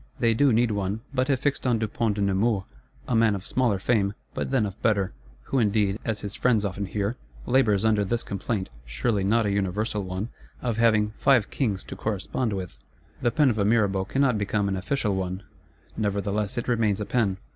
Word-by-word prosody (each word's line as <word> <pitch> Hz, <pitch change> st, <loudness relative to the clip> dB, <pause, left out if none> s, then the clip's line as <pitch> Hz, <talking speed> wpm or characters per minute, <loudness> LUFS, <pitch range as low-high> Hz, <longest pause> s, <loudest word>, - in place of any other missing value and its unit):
They 115 Hz, -1 st, +3 dB
do 135 Hz, +4 st, +4 dB
need 115 Hz, 0 st, +3 dB
one; 100 Hz, +1 st, -2 dB
but 130 Hz, -1 st, +1 dB
have 135 Hz, -3 st, +2 dB
fixed 140 Hz, -2 st, 0 dB
on 120 Hz, -2 st, +3 dB
Dupont 110 Hz, 0 st, -1 dB
de 100 Hz, -, -2 dB
Nemours; 100 Hz, +1 st, +1 dB, 0.4 s
a 125 Hz, -, +1 dB
man 115 Hz, -2 st, +4 dB
of 95 Hz, 0 st, -7 dB
smaller 125 Hz, -6 st, +1 dB
fame, 100 Hz, -1 st, +1 dB, 0.2 s
but -, -, -3 dB
then 130 Hz, -5 st, +2 dB
of 100 Hz, +2 st, -7 dB
better;—who 95 Hz, -, -1 dB
indeed, 105 Hz, -2 st, +2 dB
as 110 Hz, -3 st, -2 dB
his 100 Hz, -1 st, -5 dB
friends 115 Hz, -4 st, +2 dB
often 100 Hz, 0 st, -3 dB
hear, 105 Hz, +4 st, -2 dB, 0.3 s
labours 110 Hz, -6 st, +3 dB
under 110 Hz, -2 st, +3 dB
this 115 Hz, +4 st, -1 dB
complaint, 100 Hz, 0 st, -3 dB
surely 95 Hz, -, -1 dB
not 110 Hz, +3 st, +2 dB
a 100 Hz, -, +1 dB
universal 100 Hz, +2 st, -1 dB
one, 95 Hz, +4 st, -4 dB, 0.3 s
of 120 Hz, -3 st, -2 dB
having 110 Hz, -2 st, +3 dB
"five 125 Hz, -6 st, +3 dB
kings 105 Hz, -8 st, -1 dB
to -, -, -8 dB
correspond 110 Hz, +2 st, -2 dB
with." 95 Hz, -3 st, -5 dB, 0.4 s
The 120 Hz, -, +3 dB
pen 140 Hz, +1 st, +3 dB
of 110 Hz, -, -3 dB
a -, -, +3 dB
Mirabeau 100 Hz, -3 st, +2 dB
cannot 125 Hz, +1 st, +1 dB
become 100 Hz, 0 st, 0 dB
an 95 Hz, -, 0 dB
official 105 Hz, +3 st, -1 dB
one; 95 Hz, +1 st, -3 dB, 0.5 s
nevertheless 100 Hz, 0 st, -1 dB
it 120 Hz, -, -2 dB
remains 110 Hz, -5 st, +1 dB
a 105 Hz, -, -2 dB
pen. 100 Hz, -3 st, +1 dB
105 Hz, 195 wpm, -26 LUFS, 100-115 Hz, 0.5 s, do